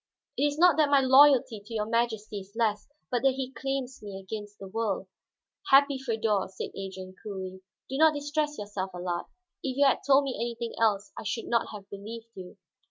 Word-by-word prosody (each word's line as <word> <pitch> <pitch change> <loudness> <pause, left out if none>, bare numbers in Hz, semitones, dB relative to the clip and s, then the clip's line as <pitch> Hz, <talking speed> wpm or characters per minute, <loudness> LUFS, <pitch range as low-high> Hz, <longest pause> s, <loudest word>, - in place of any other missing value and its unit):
It 290 - +2
is 290 0 -3
not 345 -2 +6
that 305 -2 +4
my 285 -1 +6
loyalty 265 -4 +6
to 225 +3 -10
your 210 -1 0
Majesty 220 -2 -1
is 195 +2 -14
less, 215 -3 0 0.2
but 245 -2 +1
that 270 -1 +3
he 265 -1 -4
claims 270 -1 -4
me 200 -2 -7
against 205 +1 -7
the 195 - -9
world." 210 -1 -2 0.6
"Happy 280 0 +6
Feodor," 225 -6 0
said 190 - -6
Adrian 190 -1 -7
coolly. 190 -3 -6 0.3
"Do 265 - -4
not 315 -1 +6
distress 295 +1 -1
yourself, 195 -2 -5
Allard; 175 -1 -3 0.3
if 260 -1 -3
you 285 - +5
had 270 - +4
told 280 0 +5
me 270 -2 -2
anything 235 0 -3
else 210 -2 +2
I - - -6
should 225 +2 -3
not 235 -1 +1
have 205 -2 -9
believed 225 +3 -8
you. 185 +1 -10
230 Hz, 195 wpm, -28 LUFS, 200-270 Hz, 0.6 s, not